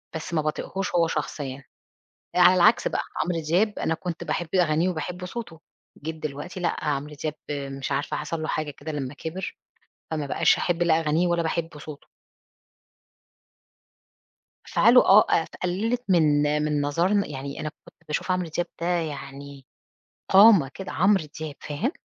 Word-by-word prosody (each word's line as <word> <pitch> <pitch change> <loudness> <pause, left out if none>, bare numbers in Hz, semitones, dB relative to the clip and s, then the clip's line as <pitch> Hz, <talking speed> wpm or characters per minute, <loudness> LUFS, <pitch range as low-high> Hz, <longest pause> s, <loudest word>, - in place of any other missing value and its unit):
بس 160 +1 -5
ما 160 - +2
باطيقهوش 185 +5 -3
هو 170 -1 +4
شخصيًا. 140 -3 -4 0.7
آآ، - - +4
على 180 +1 +8
العكس 205 +6 +4
بقى - - -1 0.2
عمرو 175 -2 -1
دياب 185 +7 +1
أنا 160 - 0
كنت 170 -1 -5
باحب 170 -1 -2
أغانيه 170 -1 +3
وباحب 180 +1 -4
صوته، 180 -4 -7 0.4
جيت 160 +2 -4
دلوقتي 155 +4 -6
لأ، 175 - -1
عمرو 150 0 -2
دياب 155 -2 -2 0.2
مش 140 -1 -4
عارفة 140 +1 -1
حصل 155 +1 -4
له - - -3
حاجة 155 -1 -2
كده 150 +2 -7
لما 140 -2 -4
كِبِر، 165 +6 -6 0.6
فما 150 -3 -2
بقاش - - +3
أحب 175 -1 0
لا 165 -2 +3
أغانيه 160 +2 +1
ولا 170 -1 +1
باحب 165 -1 -3
صوته. 145 0 -10 2.6
أفعاله 250 +2 +6
آه، 205 +3 +7
آآ، 160 - +3
ف - - -18
قلّلت 220 +7 -1
من 155 -5 +4 0.2
من 150 -1 0
نظرنا 175 +8 +1
يعني 140 -1 -6
أنا 155 0 -3 0.2
كنت - - -19
باشوف 155 +4 -2
عمرو 180 -1 0
دياب 175 - 0
ده - - -1
يعني 140 -5 -4 0.7
قامة 195 -7 +7
كده، 190 - -7
عمرو 190 -2 +3 0.2
دياب، 155 -2 -5
فاهم؟ 175 - -2
160 Hz, 160 wpm, -25 LUFS, 150-180 Hz, 2.6 s, على